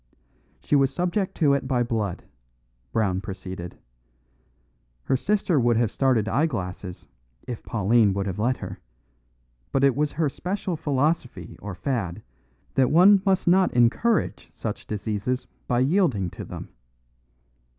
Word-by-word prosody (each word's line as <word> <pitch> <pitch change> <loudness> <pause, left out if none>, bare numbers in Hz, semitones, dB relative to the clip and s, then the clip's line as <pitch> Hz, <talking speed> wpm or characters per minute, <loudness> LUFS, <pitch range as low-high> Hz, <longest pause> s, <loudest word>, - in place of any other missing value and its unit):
"She - - +1
was 135 -1 +4
subject 180 +4 -1
to 145 -4 +3
it 140 -1 -1
by 125 -2 +2
blood," 110 -6 -2 0.7
Brown 95 -4 0
proceeded. 95 -3 -7 1.3
"Her - - +1
sister 190 +1 +1
would 120 -2 +3
have 115 -2 +1
started 125 -6 +2
eyeglasses 95 - -2 0.4
if 120 -3 -5
Pauline 110 -1 +2
would 100 -1 -1
have 95 0 -4
let 125 +4 +1
her; 95 -1 -7 0.9
but 135 - +1
it 140 -2 +4
was 150 +1 0
her 155 +1 +1
special 180 +5 -3
philosophy 140 - -1
or 100 -3 -6
fad 95 -3 -3 0.5
that 130 -2 +3
one 190 +4 +6
must 190 -1 +2
not 185 +1 +4
encourage 125 - +2
such - - -6
diseases 110 +4 -2 0.2
by 120 0 +2
yielding 130 - +2
to - - -8
them. - - -8
125 Hz, 135 wpm, -25 LUFS, 105-155 Hz, 1.3 s, one